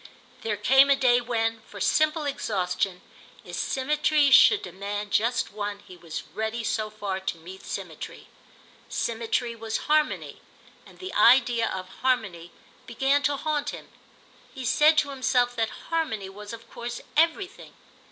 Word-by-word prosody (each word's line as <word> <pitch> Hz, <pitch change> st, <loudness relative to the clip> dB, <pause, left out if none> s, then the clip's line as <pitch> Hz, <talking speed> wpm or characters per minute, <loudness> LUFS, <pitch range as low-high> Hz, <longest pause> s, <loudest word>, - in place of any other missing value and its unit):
There 215 Hz, -2 st, -2 dB
came 270 Hz, +6 st, +5 dB
a 280 Hz, -, +6 dB
day 245 Hz, -2 st, +3 dB
when, 225 Hz, -1 st, -1 dB
for 205 Hz, -, -10 dB
simple 310 Hz, -, +2 dB
exhaustion, 195 Hz, -8 st, -2 dB, 0.4 s
if -, -, -7 dB
symmetry 295 Hz, +1 st, +1 dB
should 415 Hz, +9 st, +7 dB
demand 200 Hz, +3 st, -5 dB
just 230 Hz, +2 st, +1 dB
one 205 Hz, -1 st, -4 dB
he 185 Hz, -2 st, -14 dB
was 170 Hz, -2 st, -7 dB
ready 220 Hz, +2 st, -3 dB
so 215 Hz, -1 st, -1 dB
far 205 Hz, -3 st, -4 dB
to 190 Hz, -3 st, -4 dB
meet 180 Hz, +4 st, -11 dB
symmetry. -, -, -7 dB, 0.6 s
Symmetry 235 Hz, +1 st, -2 dB
was 225 Hz, -1 st, -4 dB
harmony, 305 Hz, 0 st, 0 dB, 0.5 s
and -, -, -17 dB
the 375 Hz, 0 st, -7 dB
idea 240 Hz, -2 st, +5 dB
of 185 Hz, -1 st, -5 dB
harmony 195 Hz, -10 st, -1 dB, 0.4 s
began 270 Hz, +4 st, +1 dB
to 285 Hz, +1 st, +1 dB
haunt 295 Hz, 0 st, -1 dB
him; -, -, -9 dB, 0.6 s
he 260 Hz, -2 st, -7 dB
said 305 Hz, +6 st, +4 dB
to 290 Hz, -1 st, +2 dB
himself 250 Hz, -2 st, +1 dB
that 225 Hz, -1 st, 0 dB, 0.2 s
harmony 220 Hz, -13 st, -1 dB
was 205 Hz, +1 st, -10 dB
of 230 Hz, 0 st, -10 dB
course 240 Hz, 0 st, -6 dB
everything. 335 Hz, +4 st, 0 dB
235 Hz, 145 wpm, -26 LUFS, 205-280 Hz, 0.6 s, should